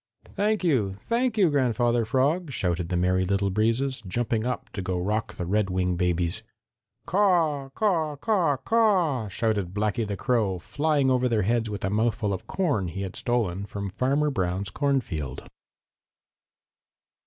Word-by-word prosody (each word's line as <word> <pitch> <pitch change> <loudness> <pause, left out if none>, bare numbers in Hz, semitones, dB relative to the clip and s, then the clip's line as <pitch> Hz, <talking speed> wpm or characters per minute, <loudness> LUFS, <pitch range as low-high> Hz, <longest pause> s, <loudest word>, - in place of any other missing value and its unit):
"Thank 210 0 0
you! 115 - +1
Thank 235 -1 0
you, 185 -6 +4
Grandfather 120 -3 +2
Frog," 140 +8 +1
shouted 90 -7 -1
the 90 - 0
Merry 90 +1 +2
Little 100 +1 0
Breezes, 115 +5 0
jumping 115 +2 -1
up 125 - -3
to 95 - -4
go 90 -1 -2
rock 105 +4 -2
the 90 - -4
Redwing 95 -2 0
babies. 90 -1 0 0.6
"Caw, 170 -7 +2
caw, 165 -8 +1
caw, 170 -4 +1
caw!" 175 - +2
shouted 100 -3 -1
Blacky 105 +1 0
the 100 -1 -3
Crow, 105 -4 +1
flying 145 - +1
over 125 0 +2
their 110 -3 +1
heads 115 +2 +1
with 100 -3 -4
a 95 - -1
mouthful 110 -1 0
of 95 - -6
corn 145 - 0
he 95 +4 -4
had 95 - -6
stolen 105 -6 -1
from 100 -1 -5
Farmer 140 +7 +1
Brown's 95 -3 -2
cornfield. 105 - -2
115 Hz, 150 wpm, -26 LUFS, 95-145 Hz, 0.6 s, you